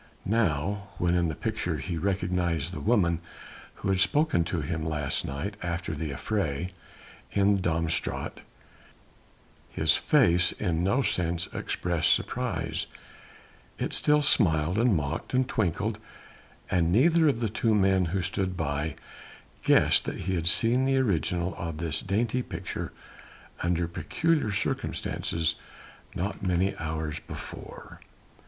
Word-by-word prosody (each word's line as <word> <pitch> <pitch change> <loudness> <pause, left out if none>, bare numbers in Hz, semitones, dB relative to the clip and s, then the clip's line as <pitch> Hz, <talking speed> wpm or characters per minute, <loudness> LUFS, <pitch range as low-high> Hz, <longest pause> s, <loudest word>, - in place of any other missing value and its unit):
Now, 100 -2 0
when 85 0 +1
in 85 -1 +2
the 80 - -3
picture - - -2
he 90 - -4
recognized 90 -2 -1
the - - -4
woman 90 -7 +2 0.6
who - - -4
had 95 -1 +2
spoken 145 - +3
to 85 -2 -2
him 80 +2 -3
last 75 -3 -1
night 70 +10 -4
after 85 0 -3
the 80 -2 -3
affray, 85 +1 -2 0.6
in 100 0 +4
the - - -3
Dam 85 -2 0
Straat, 80 - -2 1.3
his - - +2
face 85 +1 +4
in 85 -1 -1
no 125 +9 +2
sense 85 -4 0
expressed 85 -3 +1
surprise, 85 -9 -2 0.9
it - - -2
still 150 0 +3
smiled 85 - +3
and 115 -3 +4
mocked 75 - -2
and 130 0 +3
twinkled, 105 +2 -1 0.7
and 85 -2 +2
neither 160 - +5
of 135 -5 +2
the 115 - 0
two 110 +1 +1
men 95 -2 +3
who 90 +2 -1
stood 95 0 -2
by 75 -1 -2 0.7
guessed - - +4
that - - -4
he 95 +2 -1
had 85 -2 -1
seen 120 +8 +4
the 135 0 +2
original 90 - +1
of 85 -2 -4
this 80 -1 0
dainty 110 +5 0
picture - - -5 0.7
under 85 0 +1
peculiar 150 - 0
circumstances 80 -4 -1 0.6
not 95 +4 -3
many 95 +1 +1
hours 80 -1 -3
before. - - -9
90 Hz, 135 wpm, -28 LUFS, 80-105 Hz, 1.3 s, neither